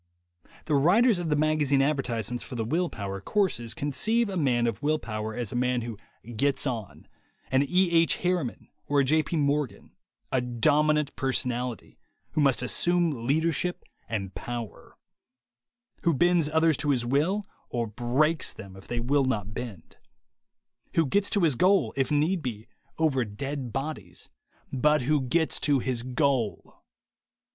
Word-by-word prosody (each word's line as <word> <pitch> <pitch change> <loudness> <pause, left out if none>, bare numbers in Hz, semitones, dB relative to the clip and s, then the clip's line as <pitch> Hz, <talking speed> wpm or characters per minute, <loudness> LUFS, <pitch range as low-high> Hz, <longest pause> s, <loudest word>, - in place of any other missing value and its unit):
The 155 - -1
writers 185 - +4
of 170 -2 -3
the 150 - +2
magazine 150 -2 +2
advertisements 125 -5 -1
for 130 - -8
the 115 -2 -2
will 170 +8 0
power 100 -2 -5
courses 120 - -1
conceive 215 - +1
a 195 - -4
man 125 -8 +2
of 115 -4 -2
will 155 +2 +2
power 110 -5 -5
as 120 -4 -3
a - - -5
man 125 0 +1
who 115 -1 -5 0.4
"gets 140 +6 +1
on," 115 -7 -5 0.4
an 130 0 +4
E. 180 +5 +2
H. 165 0 +3
Harri 180 -6 +1
man - - -11 0.2
or 145 0 +2
a - - +3
J. 155 +4 +3
P. 160 +2 -3
Morgan, 140 -7 -1 0.4
a 130 - +2
dominant 150 +5 +2
personality, 125 -3 -2 0.3
who 155 - 0
must 135 -3 +3
assume 160 -2 +1
leadership 165 +4 0 0.3
and 100 -4 -3
power; 120 -3 -7 1.0
who 170 -3 +2
bends 175 0 +3
others 160 -1 +3
to 150 - -1
his 125 -4 +1
will, 155 +11 +1 0.3
or 120 -1 -1
breaks 130 +8 +1
them 100 -3 -11
if 95 - -13
they 120 - -2
will 135 +4 +2
not 105 -5 -2
bend; 115 -8 -8 1.0
who 165 - +4
gets 200 +8 +2
to 205 - +1
his 160 -4 +4
goal, 180 - +3
if 135 -2 0
need 155 +5 +1
be, 115 -5 -5 0.3
over 145 -6 +2
dead 130 +4 -5
bodies, 135 - -6 0.4
but 150 +1 +3
who 150 +2 +2
gets 160 +5 +1
to 145 -2 +3
his 125 -2 -1
goal. 130 -3 -1
140 Hz, 160 wpm, -27 LUFS, 120-155 Hz, 1.0 s, writers